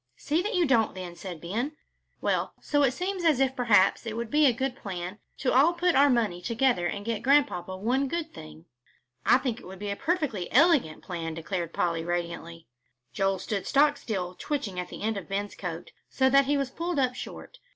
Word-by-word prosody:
"See 310 +4 0
that 425 +5 -2
you 355 -2 +3
don't, 235 -8 +2
then," 180 -2 -7
said 175 -2 -7
Ben. 225 - -3 0.5
"Well, - - 0
so 290 -1 +1
it 275 - +5
seems 365 +7 -3
as 310 -6 +4
if 265 -1 +2
perhaps 230 -3 +3
it 225 0 -4
would 235 -1 -4
be 300 0 +5
a - - +5
good 255 +2 -2
plan 185 -3 -6 0.2
to 260 - 0
all 290 +7 +5
put 350 0 +1
our 285 +2 +5
money 220 -9 +1
together 230 -3 +1
and 200 +3 -5
get 230 -2 -2
Grandpapa 255 -11 +2
one 250 +8 0
good 325 +2 -4
thing." 80 +1 -11 0.6
"I 245 - +7
think 255 -3 -3
it - - -13
would 190 +1 -9
be 205 +1 -4
a - - -2
perfectly 275 - -1
elegant 280 - +4
plan," 165 -3 -4
declared 170 0 -3
Polly, 170 -2 0
radiantly. 170 -1 -4 0.5
Joel 195 +3 +1
stood 195 +1 -3
stock 290 +1 +4
still 190 -10 -4
twitching 200 -7 -3
the 180 - -10
end 220 -1 0
of 195 - -7
Ben's 200 +1 -2
coat, 175 -2 -6 0.2
so 265 -1 +2
that 275 0 +6
he 285 +1 +1
was 275 -2 -2
pulled 340 +1 -3
up 255 -2 +2
short. - - -9
230 Hz, 205 wpm, -27 LUFS, 180-280 Hz, 0.6 s, I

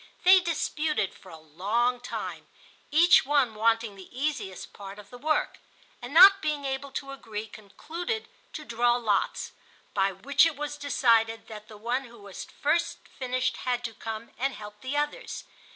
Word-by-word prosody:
They 370 +1 +8
disputed 310 - -1
for - - -16
a 160 - -10
long 205 +11 0
time—each 320 +6 +1
one 275 -5 +2
wanting 225 0 +1
the 190 -2 -12
easiest 250 -8 -4
part 200 0 -9
of 210 +2 -13
the 245 - -9
work—and 290 -3 -4
not 390 +5 +9
being 300 -2 -2
able 270 +1 -3
to 275 0 -4
agree, 220 -6 -6
concluded 325 - -6 0.3
to 305 - -7
draw 240 0 +2
lots; 215 -5 0 0.4
by 195 0 +2
which 265 +9 +3
it 325 - -3
was 295 0 -4
decided 230 -5 +2
that 215 -1 -9
the 215 - -12
one 245 +5 -2
who 235 -1 -14
was 200 -2 -8
first 335 +4 -1
finished 255 -1 -2
had 245 -1 -2
to 225 -2 -4
come 225 +1 -7
and 270 0 0
help 210 0 -10
the 265 +3 -3
others. 295 +12 -3
245 Hz, 160 wpm, -27 LUFS, 215-290 Hz, 0.4 s, not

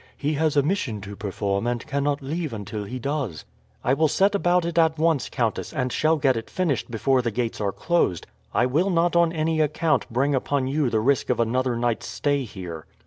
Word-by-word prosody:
"He 150 +2 -1
has 155 0 +1
a 140 - +5
mission 145 - -1
to 100 +1 -8
perform, 100 +1 -2
and 120 -1 -2
cannot 140 -1 -1
leave 155 0 -3
until 105 0 -5
he 125 +6 -5
does." 130 - -3 0.4
"I 125 - +2
will 155 +3 +3
set 195 +7 +2
about 180 -3 +2
it 170 0 0
at 160 -1 +3
once, 160 -3 +1
countess, 115 -4 -2
and 130 -1 -1
shall 160 +1 +2
get 135 -3 +2
it 115 0 -5
finished 170 -10 -1
before 130 +3 +2
the 120 - -1
gates 115 0 -3
are 100 -1 0
closed. 160 - 0 0.3
I 120 - +2
will 155 +10 +1
not 175 -1 +2
on 170 -1 +4
any 160 -1 0
account 155 +1 +1
bring 135 +5 +1
upon 135 0 0
you 140 0 +1
the 110 - +1
risk 135 +5 +1
of 125 - +1
another 125 +2 +1
night's 120 -1 -1
stay 145 -2 0
here." 90 -7 -8
135 Hz, 210 wpm, -24 LUFS, 115-155 Hz, 0.4 s, a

